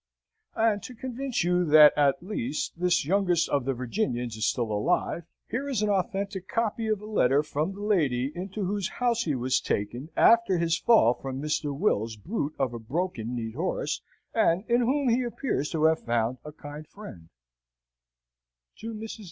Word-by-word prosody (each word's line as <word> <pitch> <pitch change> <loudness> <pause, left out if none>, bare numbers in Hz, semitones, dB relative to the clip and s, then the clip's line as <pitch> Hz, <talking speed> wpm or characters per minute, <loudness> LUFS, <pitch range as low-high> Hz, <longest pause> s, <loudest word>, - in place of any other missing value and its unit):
And 220 -2 +2
to 250 - -9
convince 260 0 -3
you 180 +1 +2
that 150 -2 +7
at 145 +2 +2
least 155 - -3
this 180 -3 +1
youngest 180 -1 +2
of 140 -3 0
the 135 -1 0
Virginians 125 - -2
is 110 0 0
still 120 -3 -1
alive, 160 +9 0 0.2
here 275 +4 -3
is 235 -6 0
an 210 - +2
authentic 195 -1 -2
copy 225 0 -1
of 215 -2 0
a - - -7
letter 145 -9 +2
from 155 +5 -2
the 205 - -7
lady 140 - +1
into 190 +3 -4
whose 200 0 -1
house 240 -1 0
he 150 -4 0
was 130 +1 +1
taken 120 +9 -3
after 230 -5 +5
his 165 -1 +1
fall 165 - +4
from 135 +1 -6
Mr. 150 0 -1
Will's 115 - 0
brute 155 - -4
of 130 -3 -1
a 120 - -5
broken 125 -2 -3
kneed 115 -2 -4
horse, 165 +9 -2 0.3
and 190 -5 +2
in 240 0 +3
whom 270 +3 +1
he 240 +2 +3
appears 240 - -2
to 160 -2 -1
have 160 0 +3
found 120 +1 0
a 150 - -8
kind 150 0 -10
friend: 95 - -12 1.5
"TO 225 0 -6
MRS. 220 +1 -7
170 Hz, 175 wpm, -27 LUFS, 135-215 Hz, 1.5 s, that